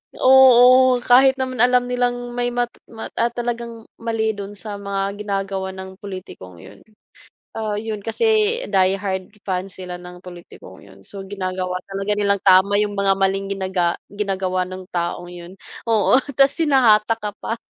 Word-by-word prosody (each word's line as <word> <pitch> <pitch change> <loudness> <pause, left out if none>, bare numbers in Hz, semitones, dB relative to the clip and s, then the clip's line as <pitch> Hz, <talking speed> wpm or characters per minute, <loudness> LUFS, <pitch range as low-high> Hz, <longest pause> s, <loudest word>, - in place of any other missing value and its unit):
Oo, 255 -1 +6
kahit 265 +2 +5
naman 260 -2 -4
alam 250 +1 +4
nilang 245 0 -2
may 245 0 -2
mat 245 0 -2 0.2
mat 225 -1 -9
at 235 0 0
talagang 235 -1 -5 0.2
mali 225 -1 -1
do'n 205 0 -8
sa 205 0 -6
mga 200 0 -3
ginagawa 195 -2 -3
ng 190 0 -10
pulitikong 180 - -10
yun, - - -14 0.8
ah, 215 -1 -2
yun 215 +1 -4
kasi 440 - +1
die 190 -1 +3
hard 190 -1 -4
fan 185 -1 -3
sila 185 -2 -7
ng 180 0 -12
pulitikong 175 - -13
yun. 95 0 -17
So 195 - -10
ginagawa 185 -2 -4
talaga 195 +1 -2
nilang 200 -1 +1
tama 190 +2 +5
yung 205 -1 0
mga 200 -1 +2
maling 195 0 0
ginaga 185 -3 -1 0.2
ginagawa 190 -3 -2
ng 185 0 -8
taong 175 0 -3
yun. 175 +2 -11 0.3
Oo, 225 +4 +3 0.2
ta's 275 0 +5
hinatak 230 -7 +3
ka 210 -2 -6
pa. 225 - -3
205 Hz, 155 wpm, -20 LUFS, 190-240 Hz, 0.8 s, Oo